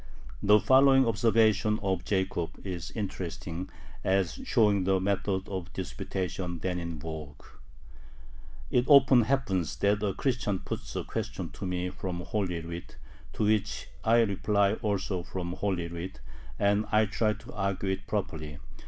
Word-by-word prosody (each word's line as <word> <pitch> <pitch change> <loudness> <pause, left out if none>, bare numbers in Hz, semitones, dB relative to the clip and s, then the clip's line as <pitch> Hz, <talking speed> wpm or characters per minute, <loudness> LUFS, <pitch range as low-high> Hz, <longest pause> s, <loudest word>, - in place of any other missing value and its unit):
The 105 +1 +6
following 135 +4 +6
observation 110 -1 +3
of 95 -3 0
Jacob 95 -3 -1
is 90 -3 -4
interesting 95 -3 -4 0.3
as 95 -2 +1
showing 105 -4 +3
the 95 0 +2
methods 95 0 -1
of 95 -3 -5
disputation 90 0 -4
then 90 +2 -2
in 85 -1 -5
vogue: 75 -2 -7 1.3
It 125 - +3
often 135 -3 +7
happens 95 - 0
that 100 +1 +2
a 100 -3 0
Christian 120 -7 0
puts - - -6
a - - -1
question - - -4
to 95 - -6
me 90 0 -2
from 90 -2 -4
Holy 90 -3 -2
Writ, 85 +1 -8 0.4
to - - -1
which 105 -1 0
I 115 +1 +5
reply 100 -1 +2
also 100 -4 -1
from 90 0 -5
Holy 90 -3 -1
Writ, 85 +2 -6 0.4
and 100 +1 +2
I 110 0 +5
try 105 +1 +1
to 110 - -12
argue 100 -1 -1
it 95 0 -4
properly. 80 -8 -3
95 Hz, 145 wpm, -29 LUFS, 90-105 Hz, 1.3 s, often